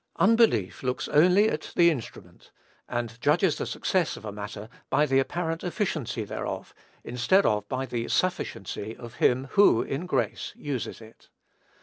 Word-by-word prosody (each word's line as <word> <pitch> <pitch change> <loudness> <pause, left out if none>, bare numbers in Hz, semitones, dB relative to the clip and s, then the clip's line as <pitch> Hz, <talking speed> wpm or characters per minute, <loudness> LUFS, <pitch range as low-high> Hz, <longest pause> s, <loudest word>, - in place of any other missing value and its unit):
Unbelief 225 - +3
looks 125 -1 -2
only 180 +8 +5
at 155 -7 -3
the 170 -1 +6
instrument, 130 -8 -8 0.4
and 120 -1 -4
judges 155 +5 +3
of - - -8
the - - -2
success 180 -4 0
of - - -11
a 105 - -4
matter 105 +1 -7 0.2
by 150 - +3
the 135 -2 +3
apparent 165 +3 -2
efficiency 165 - -2
thereof, 105 - -5 0.3
instead 125 +12 +2
of 105 -1 0
by 130 0 -2
the 120 -2 -3
sufficiency 110 - -2
of 120 -1 -11
him 130 +2 +2
who, 200 - +5
in 155 +7 -4
grace, 115 - -1
uses 135 -5 -5
it. 110 0 -16
135 Hz, 155 wpm, -27 LUFS, 115-175 Hz, 0.4 s, the